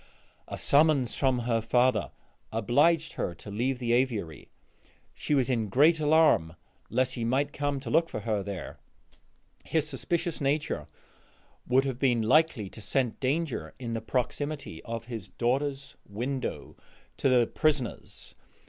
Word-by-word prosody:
A - - -6
summons 140 -5 +3
from 130 -2 +1
her 115 -1 0
father 115 - +2 0.4
obliged 145 +9 +2
her 85 - -3
to 100 +5 -10
leave 125 +5 -1
the 120 -2 0
aviary. 115 - -1 0.6
She 150 - -1
was 130 -3 +2
in 115 -4 0
great 155 - +5
alarm 150 - +4 0.3
lest 130 +3 +1
he 120 - -3
might 135 +5 0
come 145 -1 -1
to 120 -4 -6
look 165 +1 +3
for 110 - -5
her 105 -1 -1
there; 95 -3 -6 0.8
his 155 -2 0
suspicious 165 +4 -2
nature 145 +2 -1 0.8
would 130 +2 +3
have 130 -2 -3
been 120 -4 +2
likely 130 -3 +3
to 110 - -10
scent 125 +1 0
danger 135 - -2
in 120 -2 -5
the 115 - -2
proximity 130 - -3
of 115 0 -5
his 115 -5 -6
daughter's 135 +7 -2
window 125 +6 -4 0.4
to 135 - +2
the 125 -2 +5
prisoner's. 145 -3 -2
130 Hz, 145 wpm, -28 LUFS, 115-145 Hz, 0.8 s, great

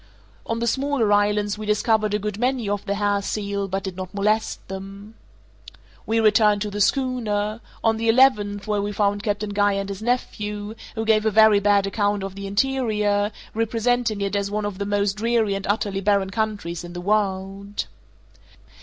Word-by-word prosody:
On 230 - -1
the 235 - -1
smaller 265 -2 +1
islands 205 0 +1
we 215 - -6
discovered 215 0 +2
a - - +3
good 210 0 -4
many 250 -2 0
of 205 0 -1
the 200 - 0
hair 205 0 +1
seal, 200 -1 -2
but 195 +1 -3
did 190 -2 -5
not 185 +1 -7
molest 215 +2 0
them. 195 +2 -8 0.9
We 225 +1 +2
returned 210 -1 +4
to 210 - -4
the 205 +1 -3
schooner 225 -4 0 0.2
on 225 -1 +3
the 225 0 0
eleventh, 210 -5 +3
where 210 -2 0
we 205 +1 -3
found 205 0 +1
Captain 205 -1 -2
Guy 205 0 +2
and 195 0 -3
his 200 +1 -6
nephew, 210 -3 -2 0.2
who 225 0 -2
gave 215 -1 +3
a - - +5
very 220 -1 +6
bad 200 -1 +3
account 205 0 0
of 195 -1 -5
the 200 0 -6
interior, 210 -3 +1 0.2
representing 225 0 0
it 200 0 -1
as 200 0 -1
one 210 0 -2
of 205 -2 -4
the 200 - -2
most 205 0 0
dreary 225 -2 +1
and 195 0 -4
utterly 200 -1 -1
barren 200 -1 +1
countries 205 -5 -3
in 175 0 -9
the 175 - -5
world. 200 0 -1
205 Hz, 185 wpm, -23 LUFS, 200-220 Hz, 0.9 s, very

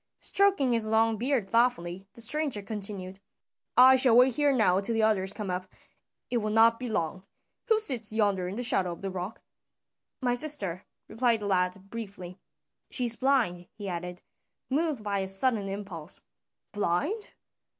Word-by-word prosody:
Stroking 390 -10 +2
his 225 -2 +1
long 220 +1 +2
beard 245 -2 -1
thoughtfully, 195 -5 0
the 235 - -6
stranger 275 -3 -1
continued, 195 -3 -5 0.6
"I 260 +1 +8
shall 250 -3 +4
wait 250 +1 +5
here 290 +2 +2
now 215 -8 +3
till 225 +3 -1
the 225 - +1
others 195 -3 +1
come 205 -2 -4
up, 180 +1 -4 0.6
it 245 - +1
will 215 -2 -1
not 225 +1 +4
be 250 -1 -5
long. 185 -2 -2 0.4
Who 445 -2 +4
sits 250 - +2
yonder 205 -4 +1
in 185 - -5
the 245 - -3
shadow 185 -7 +3
of 170 - -13
the 195 - -3
rock?" 185 +3 -6 0.8
"My 245 -2 0
sister," 225 - +1 0.2
replied 230 0 0
the - - -4
lad 190 0 -1
briefly. 195 -5 -8 0.5
"She 250 - -3
is 235 -1 +1
blind," 230 -11 0
he 205 -2 -7
added, 180 0 -6 0.5
moved 295 -5 -1
by 200 -1 -1
a 190 - -2
sudden 200 +1 +1
impulse. 195 -5 -6 0.5
"Blind? 205 - -2
215 Hz, 165 wpm, -28 LUFS, 190-245 Hz, 0.8 s, I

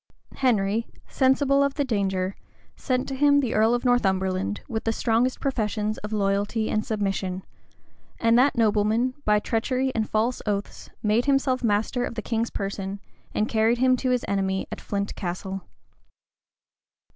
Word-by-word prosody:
Henry, 225 -3 +1 0.2
sensible 275 +1 +3
of 280 -1 0
the 285 - 0
danger, 195 -5 -1 0.4
sent 255 -2 -1
to 275 - -4
him 285 +1 +4
the 255 -5 -1
earl 220 +2 +4
of 245 - -3
Northumberland, 190 -5 +1
with 225 -3 -3
the 225 - +1
strongest 235 +3 +1
professions 215 -5 -1
of 210 - -7
loyalty 205 +1 0
and 215 - +1
submission; 195 -3 -2 0.8
and 230 0 +3
that 260 +2 +4
nobleman, 220 +3 +2
by 210 0 +4
treachery 255 +5 0
and 220 -2 -1
false 225 +3 0
oaths, 205 -1 -3
made 215 +3 +2
himself 270 -2 +1
master 225 +3 +1
of - - -4
the 220 - -4
king's 230 0 -1
person, 195 0 -4 0.4
and 215 - +1
carried 225 +1 +2
him 255 +1 +4
to 255 - -1
his 250 -1 +1
enemy 190 -1 0
at - - -6
Flint 200 0 -3
Castle. 190 +1 -4
220 Hz, 155 wpm, -25 LUFS, 200-250 Hz, 0.8 s, him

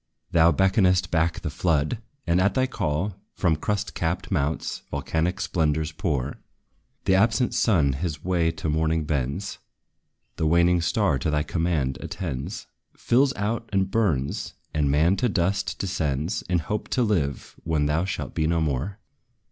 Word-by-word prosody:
Thou 85 0 +5
beckonest 95 -2 +3
back 80 0 +1
the 80 - -3
flood! 80 - 0 0.3
and 85 +2 +3
at 100 - +2
thy 130 -1 +3
call, 95 - -2 0.2
From 85 -4 +2
crust 105 +6 -2
capped 85 +4 -2
mounts, 75 -3 -1
volcanic 85 +4 -1
splendors 80 -2 0
pour. 75 -5 -2 0.7
The 95 - +3
absent 115 +5 +3
sun 90 - +3
his 75 +1 -4
way 85 -3 +2
to 80 0 -4
morning 80 +1 +1
bends; 75 +5 -2 0.8
The 80 - +1
waning 85 +2 +4
star 70 -4 +1
to 75 - -1
thy 75 0 +1
command 80 -7 -1
attends, 85 0 -5 0.3
Fills 130 +3 +3
out 115 +3 -2
and 95 -1 +1
burns; 85 -12 0 0.2
and 75 -2 +1
man 80 +7 +3
to 125 - +1
dust 95 0 0
descends, 80 -2 -1
In 90 - +3
hope 105 +6 -3
to 125 - +2
live, 80 - -1
when 80 -3 +1
thou 75 +4 +1
shalt 95 - -4
be 80 - +1
no 85 0 +2
more. 80 +5 -1
85 Hz, 155 wpm, -25 LUFS, 75-95 Hz, 0.8 s, Thou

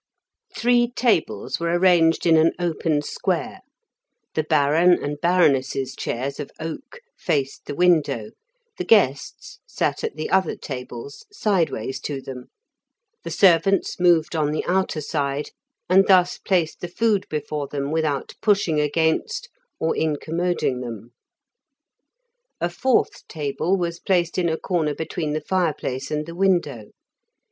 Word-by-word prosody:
Three 240 0 +3
tables 190 - 0
were 170 +1 +1
arranged 175 -3 +4
in 165 -1 +5
an 160 +1 +4
open 165 -3 -1
square; - - -2 0.7
the 155 - +1
Baron 155 +3 +4
and 145 -3 -2
Baroness's 140 -7 +2
chairs 135 +4 -4
of 140 - -5
oak 275 - -7 0.2
faced 140 -2 -2
the 145 - -4
window, 145 -10 +2 0.5
the - - -1
guests 145 - +1
sat - - -2
at - - -3
the 155 - -4
other 190 - +2
tables 125 - -8
sideways 175 - -1
to 145 -2 -4
them, 130 -2 -8 0.8
the - - -5
servants 195 +1 +3
moved 170 -2 +3
on 150 -2 +1
the 155 - -2
outer 185 -4 0
side, 145 -1 -2 0.4
and 190 +2 +5
thus 180 -2 +4
placed 175 -5 0
the 175 - -3
food 210 +2 0
before 150 -1 -3
them 140 0 -3
without 155 -3 -1
pushing 195 -7 +2
against 165 - 0 0.3
or 160 - +1
incommoding 160 -3 -1
them. 115 -1 -8 1.5
A 175 - -1
fourth 250 +8 0
table 160 +4 -1
was 170 -2 -3
placed 175 -2 0
in 175 -2 +1
a 160 - -1
corner 160 -6 -1
between 160 -1 -3
the 155 - -2
fireplace 150 -6 -2
and 150 0 -2
the 170 - -8
window. 170 - 0
160 Hz, 135 wpm, -23 LUFS, 145-180 Hz, 1.5 s, in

